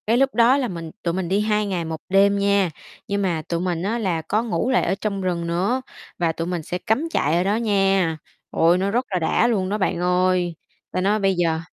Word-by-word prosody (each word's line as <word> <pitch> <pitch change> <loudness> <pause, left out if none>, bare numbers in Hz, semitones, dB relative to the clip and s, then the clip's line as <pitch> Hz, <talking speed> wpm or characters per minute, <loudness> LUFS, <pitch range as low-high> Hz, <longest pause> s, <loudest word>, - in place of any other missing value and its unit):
Cái 230 +2 +3
lúc 270 +1 +2
đó 240 +3 +5
là 265 -3 0
mình 165 -5 -6
tụi 170 - 0
mình 180 -1 -2
đi 195 +2 +2
2 210 0 +1
ngày 185 -4 -2
1 160 -1 -5
đêm 200 +1 +4
nha, 200 -2 +2 0.4
nhưng 200 0 -1
mà 175 -5 0
tụi 170 - -1
mình 175 -1 -2
á 215 +4 -1
là 180 -7 -1
có 210 +8 -1
ngủ 235 +1 -1
lại 260 - +3
ở - - 0
trong 200 -2 -2
rừng 175 -2 -2
nữa 190 +10 0 0.4
và 170 -2 +1
tụi 165 +1 -4
mình 175 -3 -3
sẽ 180 - -3
cắm 225 - 0
trại 160 - +1
ở 175 - +2
đó 200 +2 +1
nha. 195 -6 +1 0.3
Ôi, 170 +2 +3
nó 195 +2 0
rất 245 +4 0
là 185 -3 0
đã 170 +7 +2
luôn 195 -6 0
đó 210 - -1
bạn 190 -4 -1
ơi, 180 -1 +1 0.4
ta 185 - -1
nói 205 +3 +2
bây 195 -2 +2
giờ 165 -2 +1
190 Hz, 245 wpm, -22 LUFS, 175-210 Hz, 0.4 s, đó